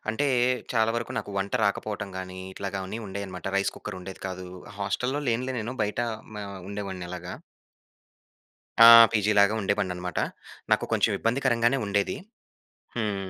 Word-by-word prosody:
అంటే 130 +7 +1 0.5
చాలా 115 -2 +3
వరకు 115 0 -3
నాకు - - -5
వంట 100 +1 -2
రాకపోవటం 100 0 -1
గాని, 95 0 -6
ఇట్లాగానీ 95 +1 -4
ఉండేయన్నమాట. 95 -2 -6
రైస్ 100 - +1
కుక్కర్ 105 -3 -7
ఉండేది 95 +1 -9
కాదు. 95 -1 -6 0.3
హాస్టల్లో 125 +8 -1
లేనులే 125 +3 0
నేను. 115 +4 -4
బయట 105 +3 -1 0.3
మ - - -6 0.3
ఉండేవాడిని 100 -3 -5
అలాగ. 90 - -7 1.6
ఆ! - - +12 0.3
పీజీ 105 -1 +2
లాగా 100 +2 +5
ఉండేవానన్నమాట. 90 -3 -1 0.5
నాకు - - +3
కొంచెం - - +3
ఇబ్బందికరంగానే 120 +1 +2
ఉండేది. 100 - 0 0.8
హ్మ్. 100 -4 -2
100 Hz, 130 wpm, -27 LUFS, 95-115 Hz, 1.6 s, ఆ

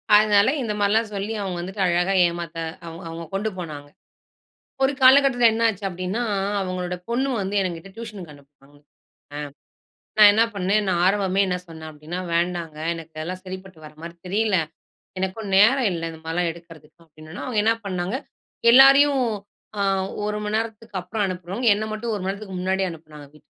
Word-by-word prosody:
அதனால 210 -1 +5
இந்த 215 -3 -2
மாரிலாம் 210 +2 +2
சொல்லி 200 +3 -3
அவங்க 185 -3 -3
வந்துட்டு 190 +3 -5
அழகா 175 +2 +2
ஏமாத்த 170 -1 -6 0.3
அவங் 165 +2 -9
அவங்க 165 0 -7
கொண்டு 210 +3 -1
போனாங்க. 150 -5 -7 1.0
ஒரு 265 - +4
காலகட்டத்துல 260 -2 +6
என்ன 230 +1 +1
ஆச்சி 200 -1 -6
அப்டினா 185 +6 -3 0.4
அவங்களோட 180 -1 -3
பொண்ணு 260 +3 0
வந்து 195 +2 -3
எங்கிட்ட 175 +1 -5
டியூஷனுக்கு 210 -9 -8
அனுப்புனாங்க. 140 0 -21 0.6
அ, - - -4 0.8
நான் 210 -1 +10
என்னா 225 +2 +4
பண்ணேன் 200 +2 +1
நான் 175 -2 +1
ஆரம்பமே 195 -1 +2
என்ன 180 -1 -1
சொன்ன 160 -1 -9
அப்டின்னா, 155 +4 -7
வேண்டாங்க 170 -2 -1 0.2
எனக்கு 165 -1 -10
அதுல்லா 180 +4 -4
சரிப்பட்டு 185 -2 -9
வர 150 - -12
மாரி 170 0 -8
தெரியல. 210 0 +1 0.6
எனக்கும் 195 +2 -3
நேரம் 240 +3 +5
இல்ல 165 -1 -4
இந்த 160 - -11
மாதிரிலாம் 170 +1 0
எடுக்கறதுக்கு 165 -1 -16
அப்டின்னுனே, 155 +3 -11
அவங்க 235 -5 -1
என்னா 225 0 +4
பண்ணாங்க 185 +5 -2 0.6
எல்லாரையும் 275 0 +7 0.6
ஆ, - - +1 0.4
1 210 0 -2
மணி 210 +1 -2
நேரத்துக்கு 220 -2 -4
அப்பறம் 205 +4 -3
அனுப்புறவங்க 185 +6 -3
என்ன 215 - -3
மட்டும் 225 +2 -3
1 200 - -4
மணி 190 - 0
நேரத்துக்கு 195 -2 -7
முன்னாடியே 190 0 0
அனுப்புனாங்க 155 -2 -12
வீட்டுக்கு. 150 +1 -20
190 Hz, 165 wpm, -23 LUFS, 170-215 Hz, 1.0 s, நான்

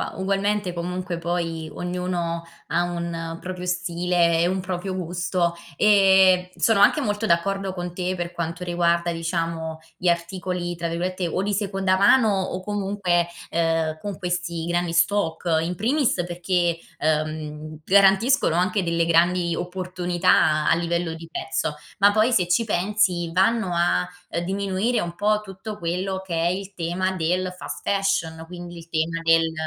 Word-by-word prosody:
ugualmente. 195 0 0
Comunque 180 0 -4
poi, 165 -2 -2
ognuno 175 0 -3 0.2
ha - - +1
un 175 -1 -3
un 165 0 -5
proprio 180 -1 -6
stile 175 -1 +1
e 170 - +3
un 190 +1 -1
proprio 185 +1 -4
gusto. 175 0 -1 0.2
Ehm, 190 -3 +5
sono 225 -3 +3
anche - - +5
molto 210 +1 -1
d'accordo 195 +2 0
con 175 -1 -5
te 180 +1 -2
per 175 -1 -4
quanto 170 +1 -4
riguarda 170 -1 +1
diciamo, 165 -1 -3 0.2
gli 180 - -3
articoli 175 +1 -1
tra 170 0 -3
virgolette 180 +2 -2
o 185 +3 -1
"di 205 +1 -1
seconda 195 -2 0
mano" 220 +4 +5
o 185 0 -4
comunque, 195 -4 0 0.2
ehm, 165 -1 0
con 205 +1 -5
questi 175 -3 -3
grandi 175 0 -1
stock. 170 -2 +1
In 175 +2 -2
primis 250 - +1
perché, 175 -1 0 0.2
ehm, 155 0 -2
garantiscono 195 - +4
anche 185 +3 +1
delle 170 -1 +1
grandi 170 +1 +3
opportunità 180 -3 +1
a - - +5
livello 170 0 -1
di 165 0 -9
prezzo, 150 +1 -2 0.2
ma 200 +1 +6
poi 215 +4 +3
se 180 -6 +3
ci 180 +7 +2
pensi 185 -4 0
vanno 190 +3 +2
a, 90 - +2 0.2
ehm, 170 - -2
diminuire 195 +5 0
un 170 0 -4
po' 210 +3 +1
tutto 205 +2 -8
quello 185 +3 -2
che 180 - -5
è 165 +1 +1
il 190 +2 -3
tema 180 +2 -1
del 175 -2 0 0.2
fast - - -7
fashion, 185 -5 0
quindi 175 0 -9
il 165 0 -12
tema 165 +1 -1
del 165 0 +4
175 Hz, 155 wpm, -24 LUFS, 170-190 Hz, 0.2 s, ma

